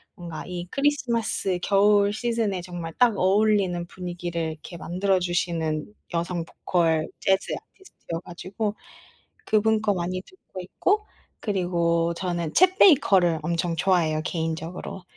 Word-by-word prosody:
뭔가 170 -3 -7
이 180 -1 -5
크리스마스 235 -9 +1
겨울 205 0 +4
시즌에 225 -4 -1
정말 175 -2 -6
딱 235 -4 +4
어울리는 190 -2 +2
분위기를 175 -2 -4
이렇게 155 +3 -10
만들어 185 +3 0
주시는 170 -3 -1 0.3
여성 170 0 -1
보컬 165 -3 0
재즈 190 0 +1
아티스트여 270 - -8
가지고 195 +4 -4 0.7
그분 220 0 +2
거 210 -1 +2
많이 185 0 -3
듣고 375 - -13
있고 405 - 0 0.3
그리고 170 -4 0
저는 170 -3 -3
쳇 370 0 +5
베이커를 190 - +5
엄청 170 +1 -1
좋아해요, 165 -4 +2
개인적으로. 165 +2 -4
180 Hz, 305 characters per minute, -25 LUFS, 170-205 Hz, 0.7 s, 쳇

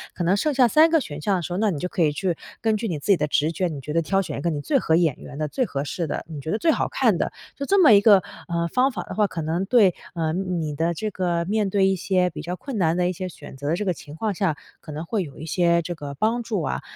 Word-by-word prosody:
可 175 - -2
能 180 +3 +3
剩 300 +7 +1
下 255 -2 +5
3 310 +7 +5
个 325 - +5
选 145 - -7
项 200 +4 +1
的 180 - -1
时 175 - -6
候， - - -2
那 215 +1 +2
你 160 - -3
就 180 - -2
可 180 - -2
以 150 - +3
去 180 +2 -1 0.3
根 220 -1 +2
据 225 +1 -3
你 170 - -2
自 - - -10
己 190 - +5
的 150 - 0
直 150 +2 +1
觉， 180 +3 -1
你 150 -5 -6
觉 150 - -6
得 165 - +2
挑 195 +4 +1
选 190 - -5
一 - - -5
个 170 - 0
你 145 -2 -3
最 280 - +1
合 160 - +2
眼 165 -5 +2
缘 - - -11
的、 155 - -1
最 255 - -1
合 140 -9 -3
适 165 +3 -3
的， - - -3
你 155 -3 -6
觉 155 - -6
得 215 - +1
最 335 - +3
好 - - 0
看 - - +2
的。 - - -1 0.2
就 280 - -4
这 390 +4 +4
么 295 - +8
一 200 -1 +7
个， 205 -4 +6 0.2
呃， 170 -1 -1
方 260 +2 +3
法 - - -5
的 - - -8
话， 210 -1 +3
可 165 - -5
能 160 +4 -1
对 200 -5 +5 0.2
呃， 160 -2 -1
你 175 -4 -2
的 165 +3 0
这 215 +6 -3
个 175 -2 -1
面 210 +1 0
对 195 0 +3
一 195 - +2
些 180 0 +1
比 150 - -7
较 175 +3 -4
困 265 +3 -6
难 170 -3 +2
的 180 0 +2
一 - - -2
些 185 +1 -5
选 160 - -12
择 145 +2 -4
的 165 - +2
这 210 - -3
个 185 - +1
情 145 -2 -12
况 210 +5 -1
下， 180 -5 0 0.3
可 155 - -10
能 155 +3 -5
会 205 +1 -1
有 145 -4 -11
一 155 - -6
些 170 +1 +2
这 175 +1 -5
个 145 -3 -7
帮 230 - 0
助 210 -6 -2
啊。 140 - -2
180 Hz, 340 characters per minute, -23 LUFS, 160-210 Hz, 0.3 s, 么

